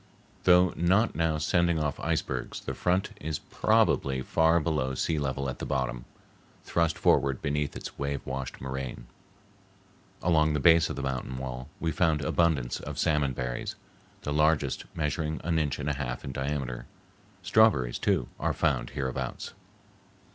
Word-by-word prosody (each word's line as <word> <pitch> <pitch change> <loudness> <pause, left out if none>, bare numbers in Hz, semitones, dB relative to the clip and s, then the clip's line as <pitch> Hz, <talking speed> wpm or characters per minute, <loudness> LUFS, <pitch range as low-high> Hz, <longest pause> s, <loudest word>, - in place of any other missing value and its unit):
Though 90 0 +6
not 95 +7 +3
now 80 -1 +1
sending 85 +2 +2
off 75 -2 -1
icebergs, - - -2
the - - -4
front 90 +4 0
is 75 -1 -2
probably 65 -1 +1
far 80 +4 +3
below 75 -5 -1
sea 80 +4 0
level 70 -1 -2
at 65 - -5
the - - -6
bottom, 65 -3 -2 0.6
thrust 85 -3 +1
forward 70 -1 +3
beneath 75 0 -1
its - - -8
wave 70 0 -2
washed 65 -1 -5
moraine. 65 -2 -5 1.2
Along 80 -3 +3
the 75 - +1
base 80 +2 +5
of - - -3
the 70 - -4
mountain 65 -1 -3
wall 65 0 -6
we 80 - 0
found 80 -1 +2
abundance 70 -5 +1
of - - -7
salmon 75 -3 +1
berries, 60 -1 -4 0.5
the 75 - -2
largest 75 -2 +2
measuring 75 0 -1
an 85 0 +1
inch 75 -3 -1
and 75 - -4
a 75 - +1
half 65 -3 -4
in 70 - -4
diameter. 65 -3 -3 0.6
Strawberries, 90 - +3
too, 90 -12 +1
are - - 0
found - - 0
hereabouts. 65 -2 -3
75 Hz, 155 wpm, -28 LUFS, 65-80 Hz, 1.2 s, Though